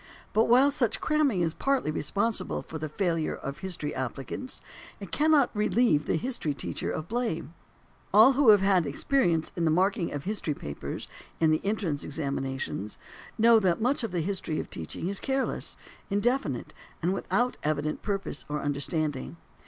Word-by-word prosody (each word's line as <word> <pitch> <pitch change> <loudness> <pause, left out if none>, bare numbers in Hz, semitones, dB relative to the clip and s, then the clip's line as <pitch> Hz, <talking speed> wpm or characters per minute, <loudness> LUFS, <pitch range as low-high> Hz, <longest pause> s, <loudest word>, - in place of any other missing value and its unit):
But 220 +1 +4
while 260 +4 +5
such 265 -5 0
cramming 300 - +2
is 165 -2 +1
partly 275 - 0
responsible 195 +6 -1
for 160 - -7
the 155 0 -4
failure 165 -1 0
of 140 +1 -6
history 180 -6 -2
applicants, 135 - -4 0.4
it - - -9
cannot 300 -5 +3
relieve 210 -7 +2
the - - +2
history 165 - -1
teacher 130 - -3
of 155 - -4
blame. 220 - -2 0.6
All 220 +7 +8
who 270 -2 +4
have 205 -2 +8
had 190 -5 +3
experience 165 - +1
in 175 - -1
the 165 - +3
marking 180 +2 +2
of 145 -1 -4
history 190 -6 -1
papers 75 - -6 0.3
in 160 -1 +4
entrance 190 -8 -1
examinations 135 -7 -3 0.4
know 230 0 +6
that 185 -5 +1
much 250 +3 +1
of 225 - -2
the 180 - -2
teaching 185 -3 -2
of - - -3
history 80 - -3
is 200 - -2
careless, 270 0 -1 0.3
indefinite, 205 - 0 0.3
and 180 +3 +2
without 245 +5 0
evident 155 0 -1
purpose 195 -7 -2
or 150 0 -1
understanding. 145 +1 -2
185 Hz, 160 wpm, -28 LUFS, 150-230 Hz, 0.6 s, All